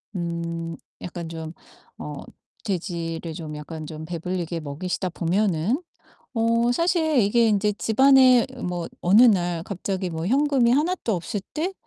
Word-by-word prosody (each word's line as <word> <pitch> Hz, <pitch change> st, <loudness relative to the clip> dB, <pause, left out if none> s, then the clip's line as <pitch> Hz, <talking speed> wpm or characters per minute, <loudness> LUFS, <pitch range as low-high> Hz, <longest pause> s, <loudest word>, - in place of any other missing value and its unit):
음 170 Hz, -1 st, -3 dB, 0.3 s
약간 170 Hz, -2 st, -6 dB
좀 160 Hz, 0 st, -6 dB, 0.4 s
어 150 Hz, -1 st, -7 dB, 0.4 s
돼지를 170 Hz, -4 st, -3 dB
좀 155 Hz, -2 st, -7 dB
약간 155 Hz, +1 st, -7 dB
좀 155 Hz, -1 st, -7 dB
배불리게 170 Hz, 0 st, -3 dB
먹이시다 180 Hz, +5 st, -3 dB
보면은 185 Hz, -, 0 dB, 0.5 s
어 230 Hz, +1 st, +2 dB
사실 320 Hz, -1 st, +2 dB
이게 230 Hz, +2 st, +4 dB
인제 210 Hz, 0 st, +2 dB
집안에 255 Hz, +1 st, +5 dB, 0.2 s
뭐 175 Hz, -2 st, -3 dB
어느 200 Hz, +7 st, +6 dB
날 175 Hz, -8 st, +3 dB
갑자기 190 Hz, -1 st, -3 dB
뭐 160 Hz, 0 st, -4 dB
현금이 270 Hz, -1 st, +3 dB
하나도 300 Hz, -, +1 dB
없을 185 Hz, +4 st, -4 dB
때 335 Hz, +5 st, -1 dB
185 Hz, 255 characters per minute, -24 LUFS, 165-235 Hz, 0.5 s, 어느